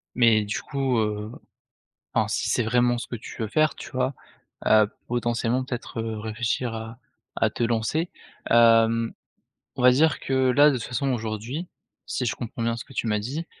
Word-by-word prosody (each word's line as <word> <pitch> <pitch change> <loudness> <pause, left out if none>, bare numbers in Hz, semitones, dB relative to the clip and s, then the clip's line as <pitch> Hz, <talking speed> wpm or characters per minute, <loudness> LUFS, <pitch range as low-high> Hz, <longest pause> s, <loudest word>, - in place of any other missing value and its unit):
mais 115 -3 +4
du 105 0 -3
coup, 135 -3 -1
heu, 105 0 -1 0.8
enfin, - - +2
si - - -1
c'est 125 - +2
vraiment 120 +1 +2
ce 120 - -5
que 120 - -5
tu 115 - -10
veux 110 - -2
faire, 155 +5 +2
tu - - -9
vois, 130 +1 -1 0.5
heu, 110 -1 +6 0.2
potentiellement 120 +1 0
peut-être, 125 -2 -5
heu, 110 -1 -3
réfléchir, 115 +2 -2
à 110 +1 -7 0.4
à - - +3
te - - -4
lancer, 120 +9 0 0.4
hem, 115 0 +5 0.6
on - - -2
va 125 0 +8
dire 155 +4 +3
que 130 -1 +1
là, 145 +4 +6
de - - -1
toute 120 - -4
façon 130 +2 -1
aujourd'hui, 115 - -4 0.4
si 125 - -2
je 110 - 0
comprends 120 +1 -7
bien 115 0 0
ce 115 - -7
que 135 - -16
tu 120 - -2
m'as 105 -1 +1
dit, 145 +10 -4
120 Hz, 190 wpm, -25 LUFS, 110-130 Hz, 0.8 s, va